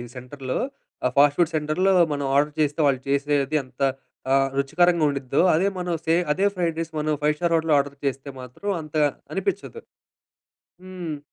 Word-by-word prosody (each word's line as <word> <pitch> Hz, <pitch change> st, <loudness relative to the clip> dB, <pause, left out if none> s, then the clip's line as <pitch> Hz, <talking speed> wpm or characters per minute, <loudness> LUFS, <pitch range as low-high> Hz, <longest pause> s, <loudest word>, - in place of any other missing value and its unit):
సెంటర్‌లో. 130 Hz, +1 st, -5 dB, 0.5 s
ఆ -, -, +4 dB
fast 145 Hz, 0 st, +5 dB
food 170 Hz, -1 st, +3 dB
సెంటర్‌లో 155 Hz, +6 st, +1 dB, 0.2 s
మనం 140 Hz, -1 st, -2 dB
ఆర్డర్ 150 Hz, +1 st, +2 dB
చేస్తే 150 Hz, +1 st, 0 dB
వాళ్ళు 130 Hz, -2 st, +1 dB
చేసేది 145 Hz, +1 st, +1 dB
ఎంత 130 Hz, +1 st, -16 dB, 0.5 s
ఆహ్, 135 Hz, 0 st, +4 dB
రుచికరంగా 170 Hz, +4 st, +2 dB
ఉండిద్దో. 140 Hz, +1 st, 0 dB
అదే 185 Hz, +5 st, +2 dB
మనం 180 Hz, -1 st, -2 dB
సే 165 Hz, 0 st, +3 dB, 0.2 s
అదే 190 Hz, +6 st, +1 dB
ఫ్రైడ్ 170 Hz, -3 st, -1 dB
రైస్ 165 Hz, 0 st, -4 dB
మనం 155 Hz, 0 st, 0 dB
ఫైవ్ 150 Hz, +1 st, +2 dB
స్టార్ 170 Hz, 0 st, 0 dB
హోటల్లో 160 Hz, -2 st, +2 dB
ఆర్డర్ 140 Hz, 0 st, -3 dB
చేస్తే 135 Hz, +1 st, -2 dB
మాత్రం 125 Hz, -, -7 dB
అంతగా 150 Hz, -1 st, +1 dB, 0.3 s
అనిపించదు. 195 Hz, -, -3 dB, 1.0 s
హ్మ్. 185 Hz, 0 st, -10 dB
హ్మ్. 155 Hz, -4 st, -4 dB
150 Hz, 165 wpm, -24 LUFS, 140-170 Hz, 1.0 s, fast